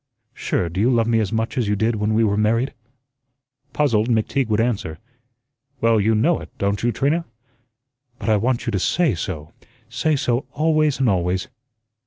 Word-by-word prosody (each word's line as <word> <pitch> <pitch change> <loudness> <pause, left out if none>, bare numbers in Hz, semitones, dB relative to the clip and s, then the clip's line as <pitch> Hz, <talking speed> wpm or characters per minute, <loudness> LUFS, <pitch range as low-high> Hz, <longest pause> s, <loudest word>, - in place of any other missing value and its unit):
Sure, 90 - -1
do 90 +4 -3
you 120 - +3
love 120 -3 +2
me 115 0 +2
as 105 -4 -1
much 115 +4 -1
as 115 - 0
you 105 - +1
did 110 +2 0
when 105 +1 0
we 115 - +3
were 100 -2 +2
married?" 115 +5 +1 1.0
Puzzled, 120 -6 +1
McTeague 120 +3 +1
would 110 -1 +1
answer: 110 -9 -1 0.8
"Well, 115 -2 +3
you 110 +2 +2
know 155 +11 +2
it, - - -10
don't 100 0 -1
you, 120 - +1
Trina?" 145 +9 0 0.9
"But - - -7
I 110 -1 +4
want 120 +3 0
you 115 - -1
to 100 - 0
SAY 165 - +1
so; 80 -3 -5 0.4
say 150 +6 0
so 130 -1 -1
always 155 -2 +1
and 130 - +2
always." 90 -1 0
115 Hz, 185 wpm, -21 LUFS, 105-130 Hz, 1.0 s, I